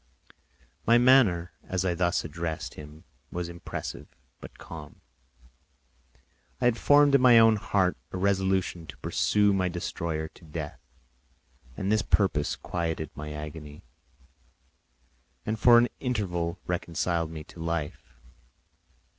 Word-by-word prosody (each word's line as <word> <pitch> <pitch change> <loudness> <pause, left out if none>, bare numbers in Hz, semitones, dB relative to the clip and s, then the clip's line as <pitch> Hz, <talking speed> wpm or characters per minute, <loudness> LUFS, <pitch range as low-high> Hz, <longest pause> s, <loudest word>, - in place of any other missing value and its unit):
My 115 +1 +6
manner 120 -9 +4
as 95 0 -2
I 90 - +1
thus 85 0 0
addressed 80 0 -4
him 75 +1 -12 0.3
was 90 -1 -3
impressive 85 0 -7 0.3
but - - -12
calm; 80 -3 -10 1.6
I - - 0
had 120 -2 +4
formed 145 0 +5
in 140 - +5
my 125 -2 +7
own 115 -1 +7
heart 100 -3 +1 0.2
a - - -4
resolution 95 -3 0
to - - -10
pursue 105 -1 +2
my 95 -1 +1
destroyer 85 -2 -3
to - - -20
death, 80 -1 -6 1.0
and 95 +1 -1
this 110 0 +3
purpose 95 -10 +1
quieted 80 -3 -3
my 75 0 -7
agony 75 0 -8 1.6
and 110 0 -2
for 120 +1 +7
an 120 +1 +5
interval 90 -9 -2
reconciled 85 -1 -1
me 80 -1 -7
to 80 - -15
life. 80 -5 -4
90 Hz, 125 wpm, -27 LUFS, 80-105 Hz, 1.6 s, my